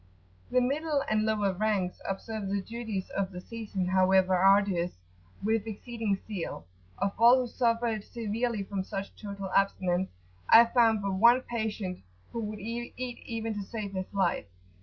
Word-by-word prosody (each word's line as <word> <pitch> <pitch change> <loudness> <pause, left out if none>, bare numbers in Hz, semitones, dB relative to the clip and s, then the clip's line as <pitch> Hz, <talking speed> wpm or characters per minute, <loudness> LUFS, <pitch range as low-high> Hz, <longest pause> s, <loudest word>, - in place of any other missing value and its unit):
The 255 - +3
middle 285 +2 0
and 215 0 +1
lower 205 -3 +1
ranks 195 -2 -1
observe 205 +1 -4
the 200 +1 0
duties 220 -2 -5
of 195 -1 -1
the 180 - -7
season, 205 -2 -4
however 185 0 +4
arduous, 190 -2 +3 0.5
with 220 +1 +1
exceeding 220 -1 -2
zeal: 185 - -5 0.3
of 200 0 0
all 240 +3 +7
who 250 - -3
suffered 230 -3 0
severely 230 -1 -2
from 195 -1 -3
such 195 +1 -6
total 200 -2 -6
abstinence, 190 -2 +1 0.4
I 235 - +9
found 230 -3 +3
but 195 -1 -1
one 235 +6 +6
patient 220 -6 -3 0.3
who 235 - -4
would 210 0 -5
eat 230 +3 -5
even 230 -2 -4
to 205 - -4
save 200 0 -5
his 185 -1 -4
life. 190 -3 +1
210 Hz, 155 wpm, -29 LUFS, 195-230 Hz, 0.5 s, I